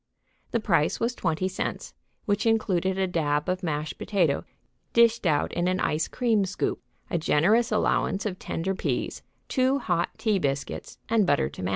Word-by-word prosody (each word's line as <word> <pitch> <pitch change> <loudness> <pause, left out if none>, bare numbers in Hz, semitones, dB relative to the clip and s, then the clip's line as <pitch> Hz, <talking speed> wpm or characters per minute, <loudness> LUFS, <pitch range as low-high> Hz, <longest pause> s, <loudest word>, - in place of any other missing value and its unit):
The 235 - 0
price 165 -8 +1
was 235 +1 0
twenty 180 -4 -1
cents, 185 - -4 0.3
which 205 +2 +1
included 190 -4 +1
a 190 - +2
dab 150 -5 0
of 185 0 -1
mashed 155 -3 -3
potato 175 -9 +1 0.5
dished 235 -3 +4
out 150 -3 +1
in 175 +1 0
an 185 0 +1
ice 155 +1 0
cream 230 -5 +1
scoop, 190 0 -2 0.3
a 170 - +1
generous 205 +11 +3
allowance 215 -1 +1
of 185 -3 -3
tender 185 +4 -2
peas, - - -2 0.3
two 260 +1 +2
hot 175 -9 0
tea 215 -4 +1
biscuits 140 -3 -3
and 220 -4 +3
butter 65 - +2
to 70 - -9
match. 90 - -1
185 Hz, 170 wpm, -26 LUFS, 160-215 Hz, 0.5 s, dished